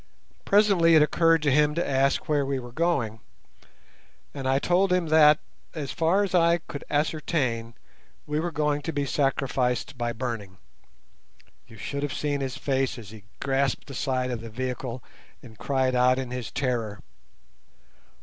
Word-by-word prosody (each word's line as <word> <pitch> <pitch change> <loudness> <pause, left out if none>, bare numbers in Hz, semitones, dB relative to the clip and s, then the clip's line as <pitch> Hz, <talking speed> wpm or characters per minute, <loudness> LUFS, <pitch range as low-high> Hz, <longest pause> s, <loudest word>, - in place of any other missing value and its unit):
Presently 195 -5 +4
it 155 - +7
occurred 165 +1 +3
to 145 - +3
him 150 +2 +3
to 170 - -1
ask 135 0 +1
where 145 -2 +2
we 135 0 -1
were 120 -2 -8
going, 120 -8 -1 1.1
and 135 -2 -4
I 135 0 +3
told 180 +6 +2
him 180 -3 +1
that, 155 -1 +6 0.4
as 145 -4 -4
far 170 +5 +2
as 195 - -3
I 170 -1 +4
could 150 -4 -9
ascertain, 145 -7 -1 0.5
we 150 +1 -1
were 170 +2 -2
going 150 -1 0
to 165 - -3
be 145 -2 -1
sacrificed 135 -2 -1
by 120 0 -1
burning. 115 -6 -5 1.1
You 115 - -14
should 140 +7 -4
have 145 -2 -3
seen 145 -1 -1
his 130 -1 -3
face 135 -2 -1
as 110 -4 -10
he 110 -3 -13
grasped 135 -1 0
the 140 - -10
side 130 -1 -1
of 120 -2 -4
the 115 - -8
vehicle 125 +1 -4 0.4
and 115 -3 -13
cried 130 -2 0
out 125 +1 +4
in 130 -2 -4
his 125 -2 -5
terror. 115 -6 -2
135 Hz, 165 wpm, -26 LUFS, 125-155 Hz, 1.1 s, it